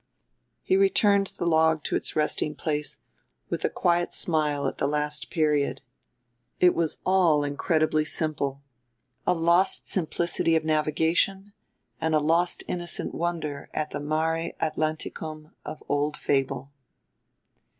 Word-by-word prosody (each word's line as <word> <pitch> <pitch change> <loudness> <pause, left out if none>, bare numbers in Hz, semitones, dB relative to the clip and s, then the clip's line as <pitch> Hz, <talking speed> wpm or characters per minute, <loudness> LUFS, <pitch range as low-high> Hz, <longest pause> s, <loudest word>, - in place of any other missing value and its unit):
He 375 - +2
returned 210 - +4
the 175 - -6
log 160 -2 +3
to - - -1
its - - -2
resting 150 0 0
place 150 -1 -2 0.5
with - - -2
a - - +2
quiet 175 0 0
smile 150 -4 +1
at - - -5
the 140 - +1
last 150 +1 0
period. 150 -5 0 0.8
It 180 -1 +5
was 165 -2 -1
all 175 -6 +3
incredibly 155 +2 +1
simple 145 -3 -2 0.6
a 180 - +3
lost 170 +3 +3
simplicity 170 -1 +1
of 160 -1 0
navigation 160 +6 +1 0.5
and 160 -1 +1
a - - +4
lost 165 +4 +2
innocent 175 -1 -3
wonder 165 -4 -3
at 155 0 -2
the 145 - -4
Mare 160 +3 -1
Atlanticum 155 0 -3
of 155 +1 -8
old 145 +1 0
fable. 135 0 -1
155 Hz, 130 wpm, -26 LUFS, 150-170 Hz, 0.8 s, It